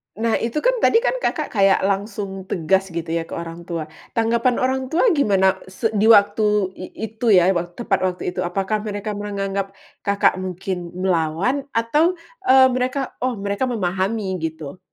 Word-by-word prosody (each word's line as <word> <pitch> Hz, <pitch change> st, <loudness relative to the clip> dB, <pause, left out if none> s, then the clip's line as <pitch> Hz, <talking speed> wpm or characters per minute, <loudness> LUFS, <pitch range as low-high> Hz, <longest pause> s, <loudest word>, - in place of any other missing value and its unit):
Nah 225 Hz, +2 st, 0 dB
itu 230 Hz, +4 st, -3 dB
kan -, -, +3 dB
tadi -, -, +5 dB
kan -, -, +1 dB
Kakak 305 Hz, -, -1 dB
kayak 195 Hz, -3 st, +3 dB
langsung 195 Hz, -1 st, -3 dB
tegas 190 Hz, +3 st, +1 dB
gitu 170 Hz, -1 st, -2 dB
ya 165 Hz, 0 st, -2 dB
ke -, -, -9 dB
orang 170 Hz, +1 st, -7 dB
tua. 170 Hz, -2 st, -3 dB, 0.3 s
Tanggapan 235 Hz, +2 st, +2 dB
orang 260 Hz, +1 st, +1 dB
tua 330 Hz, -, +1 dB
gimana 195 Hz, -, +2 dB
se 220 Hz, +4 st, -2 dB
di 210 Hz, +1 st, +2 dB
waktu 205 Hz, -2 st, +4 dB
i 185 Hz, -, -8 dB, 0.3 s
itu 225 Hz, +2 st, -6 dB
ya, 180 Hz, +1 st, +5 dB
wa 175 Hz, -1 st, -1 dB
tepat 195 Hz, +2 st, -2 dB
waktu 180 Hz, -1 st, -4 dB
itu? -, -, -6 dB
Apakah 195 Hz, +4 st, -1 dB
mereka 205 Hz, +1 st, -4 dB
menganggap 200 Hz, -1 st, -3 dB, 0.3 s
Kakak 200 Hz, -2 st, +2 dB
mungkin 180 Hz, -1 st, -5 dB
melawan 185 Hz, -, 0 dB
atau, 300 Hz, +10 st, +2 dB, 0.3 s
eee, 260 Hz, 0 st, +7 dB
mereka 255 Hz, +2 st, -1 dB
oh 255 Hz, -1 st, 0 dB
mereka 200 Hz, +5 st, -2 dB
memahami 190 Hz, -2 st, -1 dB
gitu? 160 Hz, 0 st, -5 dB
200 Hz, 165 wpm, -21 LUFS, 185-230 Hz, 0.3 s, eee